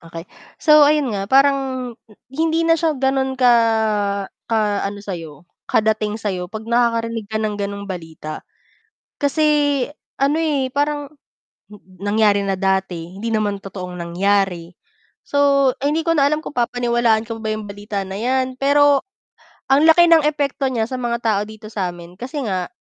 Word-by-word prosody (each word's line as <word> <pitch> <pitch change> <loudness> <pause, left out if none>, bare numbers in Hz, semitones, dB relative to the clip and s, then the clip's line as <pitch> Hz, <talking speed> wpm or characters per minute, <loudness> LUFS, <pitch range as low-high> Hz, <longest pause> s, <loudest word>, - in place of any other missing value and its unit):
Okey. 165 0 -9 0.3
So 305 -1 +6
ayun 295 -5 +2
nga 195 0 -3
parang, 265 -2 +2 0.4
hindi 325 +2 +1
na 330 0 +4
siya 315 -3 0
ga'non 265 0 0
ka 250 -1 +5 1.0
ka 225 - +1 0.3
ano 205 0 -7
sa'yo, 165 -6 -8 0.2
kadating 215 -1 +1
sa'yo, 185 -5 -3
'pag 220 +1 -7
nakakarinig 230 -2 0
ka 220 - -3
ng 215 -1 -1
gano'ng 200 0 -4
balita. 160 -4 -7 0.8
Kasi 290 -1 +2 0.4
ano, 280 +3 +2
eh, 290 -5 0
parang, 290 0 -1 0.9
nangyari 205 0 +2
na 195 -1 -1
dati, 190 -3 -1
hindi 225 +3 -4
naman 210 -2 0
totoong 185 -2 -7
nangyari, 180 0 -1 0.5
so 280 -2 +3
hindi 295 +4 0
ko 330 - +1
na 280 -1 +4
alam 305 +1 -1
kung - - -6
papaniwalaan 240 -2 +1
ko 230 -1 -7
pa 220 - -5
ba - - 0
'yung 215 - -6
balita 205 0 -4
na 190 +1 -6
'yan, 260 +2 -1
pero 285 0 +4 0.7
ang 275 +3 +4
laki 340 +2 +6
ng 330 -2 +6
epekto 290 -1 -1
niya 225 -2 -1
sa 260 - -4
mga 240 -1 -2
tao 215 -4 +1
dito 215 0 -11
sa'min. 180 -4 -5
Kasi 260 +6 -5
nga 185 -2 -1
230 Hz, 155 wpm, -20 LUFS, 200-280 Hz, 1.0 s, So